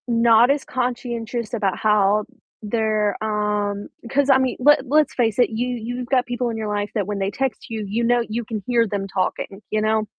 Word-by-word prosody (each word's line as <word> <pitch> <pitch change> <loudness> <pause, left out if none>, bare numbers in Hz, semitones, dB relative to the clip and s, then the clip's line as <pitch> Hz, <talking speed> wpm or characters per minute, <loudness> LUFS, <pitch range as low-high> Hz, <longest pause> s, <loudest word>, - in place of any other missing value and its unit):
Not 235 0 +5
as 280 -1 0
conscientious 240 -2 -3
about 200 -5 0
how 210 -1 +2 0.4
they're, 215 -1 0
um 210 -1 -1 0.2
'cause 285 +2 +1
I 270 - +7
mean, 260 -1 0
let 285 +1 +5
let's 300 +3 +2
face 225 -2 0
it, 245 - +4
you 230 +3 -2
you've 245 +1 -4
got 255 0 +2
people 245 0 -2
in 225 - -4
your 220 -1 -3
life 205 0 -2
that 205 -4 -1
when 205 -1 -3
they 195 +1 -1
text 270 +1 -3
you, 220 -2 -4
you 225 +4 -1
know 240 +1 +3
you 230 +2 -3
can 215 -2 -5
hear 235 -2 +3
them 200 -1 -3
talking, 195 +1 -3
you 215 - 0
know? 215 0 +1
225 Hz, 205 wpm, -22 LUFS, 210-245 Hz, 0.4 s, I